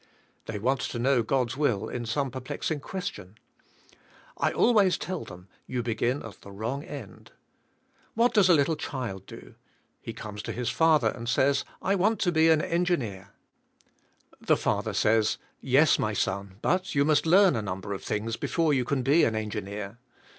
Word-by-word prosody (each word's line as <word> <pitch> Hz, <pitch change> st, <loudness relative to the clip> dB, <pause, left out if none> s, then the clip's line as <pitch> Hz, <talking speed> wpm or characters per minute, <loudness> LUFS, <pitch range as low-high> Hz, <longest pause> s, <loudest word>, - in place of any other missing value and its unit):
They -, -, -4 dB
want 130 Hz, +6 st, 0 dB
to -, -, -4 dB
knov/ 125 Hz, -2 st, +2 dB
God's 130 Hz, -3 st, 0 dB
will 120 Hz, -8 st, 0 dB
in 120 Hz, -1 st, -5 dB
some 135 Hz, +3 st, -1 dB
perplexing 130 Hz, +4 st, -4 dB
question. 125 Hz, -, -6 dB, 1.0 s
I -, -, 0 dB
always 210 Hz, -6 st, +3 dB
tell 185 Hz, -1 st, -4 dB
them, 90 Hz, +1 st, -12 dB, 0.2 s
you 125 Hz, -2 st, -2 dB
be 115 Hz, -1 st, -1 dB
gin 125 Hz, +5 st, -1 dB
at 110 Hz, -, -11 dB
the 100 Hz, -, -12 dB
wrong 115 Hz, +8 st, -4 dB
end. 140 Hz, -, -10 dB, 0.8 s
What 235 Hz, +2 st, +3 dB
does 200 Hz, -4 st, +5 dB
a 175 Hz, -, +7 dB
little 150 Hz, +2 st, +2 dB
child 115 Hz, -11 st, -5 dB
do? -, -, -12 dB, 0.5 s
He -, -, -6 dB
comes 105 Hz, -1 st, -7 dB
to -, -, -5 dB
his 120 Hz, -1 st, -2 dB
father 155 Hz, -8 st, +3 dB
and 115 Hz, +2 st, -6 dB
says, 140 Hz, +2 st, +2 dB
' -, -, -24 dB
' -, -, -44 dB
I 195 Hz, -, +2 dB
want 205 Hz, +3 st, +2 dB
to 175 Hz, -, +2 dB
be 160 Hz, 0 st, +4 dB
an 160 Hz, -1 st, +4 dB
engineer," 130 Hz, -, -1 dB, 1.1 s
the -, -, +3 dB
father -, -, -1 dB
says, 110 Hz, 0 st, +2 dB, 0.2 s
"Yes, 135 Hz, +5 st, +4 dB
my 110 Hz, 0 st, 0 dB
son, 100 Hz, -1 st, -2 dB
but 185 Hz, -2 st, 0 dB
you 140 Hz, 0 st, +3 dB
must 155 Hz, +1 st, +2 dB
learn 190 Hz, 0 st, +6 dB
a 110 Hz, -, -1 dB
num 95 Hz, -2 st, -4 dB
ber 100 Hz, -, -5 dB
of 95 Hz, -, -6 dB
things 115 Hz, +2 st, -2 dB
before 165 Hz, -3 st, +1 dB
you 130 Hz, -2 st, +2 dB
can 130 Hz, +1 st, -1 dB
be 145 Hz, +6 st, +4 dB
an 110 Hz, -, +2 dB
engineer." 105 Hz, 0 st, -5 dB
130 Hz, 185 wpm, -27 LUFS, 110-160 Hz, 1.1 s, a